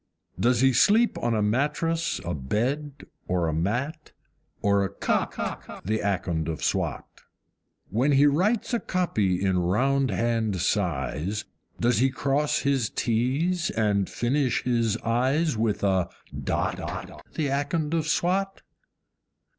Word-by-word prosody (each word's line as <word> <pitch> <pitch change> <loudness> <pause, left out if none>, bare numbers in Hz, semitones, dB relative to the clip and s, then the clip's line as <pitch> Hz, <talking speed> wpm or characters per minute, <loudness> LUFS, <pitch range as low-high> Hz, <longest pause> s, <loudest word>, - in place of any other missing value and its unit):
Does 120 +4 +3
he 135 -1 +5
sleep 220 - +4
on 120 -1 0
a 105 - +1
mattress, 150 +9 0
a 85 - -2
bed, 130 - -2 0.2
or 90 -2 +1
a 80 - -1
mat, 125 - -2 0.5
or 100 -1 +2
a 95 - -1
COT, 100 - -3
The 110 +3 0
Akond 85 -5 -1
of 80 -3 -4
Swat? - - -1 0.9
When 130 +8 +2
he 140 +1 +5
writes 190 - +2
a 235 - +2
copy 105 - 0
in 95 -1 +2
round 130 +10 +2
hand 110 -1 0
size, 90 0 -1 0.3
Does 120 -1 +2
he 135 +2 +4
cross 140 +2 0
his 135 -5 +1
T's 140 +10 0
and 105 -3 +1
finish 130 +2 0
his 115 -3 +1
I's 130 +7 +1
with 110 -2 0
a 95 -3 +2 0.2
DOT, - - -1 0.6
The 150 -3 0
Akond 150 +3 -1
of 160 -2 0
Swat? 190 +4 0
120 Hz, 130 wpm, -26 LUFS, 100-145 Hz, 0.9 s, he